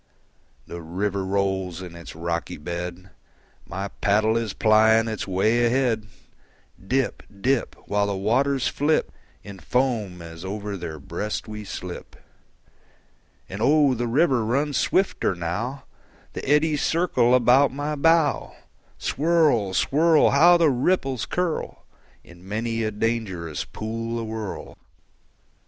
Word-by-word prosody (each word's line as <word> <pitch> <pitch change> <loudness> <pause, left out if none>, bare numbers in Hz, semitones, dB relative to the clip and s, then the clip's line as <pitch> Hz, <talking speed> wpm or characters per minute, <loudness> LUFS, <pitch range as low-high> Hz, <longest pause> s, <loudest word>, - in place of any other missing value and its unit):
The 85 - -8
river 95 +4 -2
rolls 95 -2 -1
in 85 -2 -9
its 85 -2 -10
rocky 85 -2 -3
bed; 85 +4 -6 0.6
My 95 +3 -4
paddle 110 +3 +1
is 115 -2 -1
plying 110 +1 +4
its 110 -3 -4
way 110 +6 +2
ahead; 120 -3 +1 0.8
Dip, 130 +6 -1 0.2
dip, 130 +3 0
While 100 0 +1
the 100 - -2
waters 130 +7 +1
flip 150 +2 +1 0.3
In 100 -2 -10
foam 115 -9 -1
as 85 0 -10
over 100 +1 -4
their 85 -4 -6
breast 105 +11 -4
we 105 0 -7
slip. 90 -3 -8 1.3
And 95 +3 -7
oh, 145 +2 +4
the 120 0 -2
river 130 -1 +2
runs 140 +6 0
swifter 190 - +1
now; 105 +11 -4 0.5
The - - -5
eddies 150 0 +3
circle 130 -8 +2
about 125 +3 +5
my 145 +3 -3
bow. 165 0 +2 0.4
Swirl, 150 - +1
swirl! 160 - +4
How 175 +5 +6
the 165 -4 +4
ripples 135 -2 0
curl 180 -3 -3 0.4
In 85 +1 -16
many 115 +2 -2
a 110 - 0
dangerous 105 -8 -2
pool 115 +1 -4
awhirl! 110 -2 -6
110 Hz, 125 wpm, -24 LUFS, 95-135 Hz, 1.3 s, How